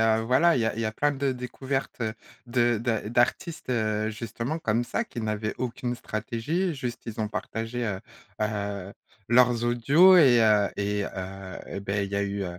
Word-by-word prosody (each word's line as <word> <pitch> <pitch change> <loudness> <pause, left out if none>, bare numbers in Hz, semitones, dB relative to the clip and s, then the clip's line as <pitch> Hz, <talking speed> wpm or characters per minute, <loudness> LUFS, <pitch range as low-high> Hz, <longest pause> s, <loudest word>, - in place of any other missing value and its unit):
heu, 110 0 +3
voilà, 130 +9 +4
il 125 - +1
y - - +1
a 110 - -1
il 115 - -4
y - - -1
a 110 - 0
plein 145 +7 +1
de 140 -1 0
découvertes 130 +1 -4 0.4
de 120 -1 +2
de 115 -2 -1
d'artistes, 120 +6 0
heu, 110 -2 0
justement 115 +7 -4
comme 115 -6 0
ça 225 - -2
qui 125 - -7
n'avaient 110 0 -2
aucune 125 0 -3
stratégie, 120 - -2
juste, 125 -4 -5
ils 110 -1 -5
ont 105 - -1
partagé, 115 +3 -4
heu, 100 -3 -3 0.4
heu, 100 -2 -3 0.4
leurs 120 0 +4
audios 140 +11 +6
et 130 -8 +7
heu 105 -2 +4
et 100 0 -1
heu 95 0 -7
et - - -5
beh, 100 0 -1
il - - -10
y 100 - -2
a 100 - +1
eu, 100 0 -3
heu, 90 -2 -5
115 Hz, 195 wpm, -27 LUFS, 105-125 Hz, 0.4 s, et